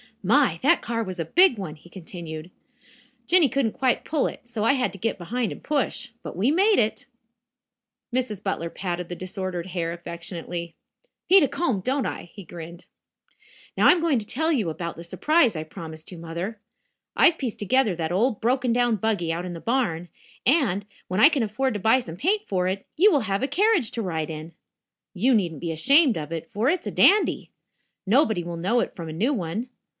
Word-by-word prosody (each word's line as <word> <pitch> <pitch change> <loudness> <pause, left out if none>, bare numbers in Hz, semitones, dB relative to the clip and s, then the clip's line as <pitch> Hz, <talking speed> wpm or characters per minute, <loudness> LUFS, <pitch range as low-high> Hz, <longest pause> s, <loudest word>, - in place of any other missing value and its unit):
"My, - - +3
that - - +4
car 230 -1 -1
was 185 -3 -6
a 165 - -1
big 345 - +5
one," 165 -6 -5
he 165 +3 -18
continued. 170 -3 -8 0.8
"Jinny 345 -5 +5
couldn't 250 -2 0
quite 260 -2 0
pull 305 -4 0
it, - - -8
so 230 -3 -3
I 230 - +4
had 255 -2 0
to 195 - -10
get 230 +4 -1
behind 230 +6 -2
and - - -9
push. 285 -2 -1
But - - -8
we 210 +10 +2
made 395 +6 +4
it." 220 +5 0 1.1
Mrs. 240 -6 -1
Butler 180 -4 -2
patted 175 -1 -4
the 175 - -4
disordered 185 -1 -5
hair 170 -2 -2
affectionately. 170 0 -7 0.5
"Need 380 -1 +7
a - - +3
comb, 250 - -1
don't 265 +6 0
I?" - - -6
he 200 - -10
grinned. 170 0 -10 0.9
"Now, - - +5
I - - +9
am 350 - +2
going 325 -5 +2
to 210 - -7
tell 320 +9 0
you 225 - +1
about 170 +1 -5
the 170 - -9
surprise 275 - +2
I 155 - -3
promised 160 -1 -10
you, 175 - -9
Mother. 170 +6 -5 0.6
I've 335 - +5
pieced 250 -6 -4
together 215 -1 +2
that 165 -1 -3
old 220 +5 +1
broken 250 +1 +1
down 240 -2 +2
buggy 200 -5 -1
out 175 +2 -4
in 180 - -5
the 165 - -7
barn, 175 -8 -1 0.4
and, 235 - +2 0.2
when 185 +2 -2
I 280 - +8
can 290 -5 0
afford 235 +5 -1
to - - -2
buy 225 +6 +4
some 165 -10 -7
paint 400 - +1
for 185 -2 0
it, 195 +1 -3
you 405 +6 +5
will 290 - +3
have 200 -1 -1
a - - +1
carriage 360 - +2
to 230 - -3
ride 160 -4 -3
in. 155 +2 -8 0.6
You 245 +8 +3
needn't 175 - 0
be 170 - -2
ashamed 275 - +4
of 155 0 -6
it, 165 +7 -5
for 225 +4 +1
it's 355 +2 -1
a - - -2
dandy. 415 +2 +3 0.6
Nobody 220 - +3
will 170 0 -5
know 195 +9 +1
it - - -4
from 165 -3 -7
a - - -6
new 230 - +1
one. 210 +3 -3
205 Hz, 205 wpm, -25 LUFS, 170-260 Hz, 1.1 s, I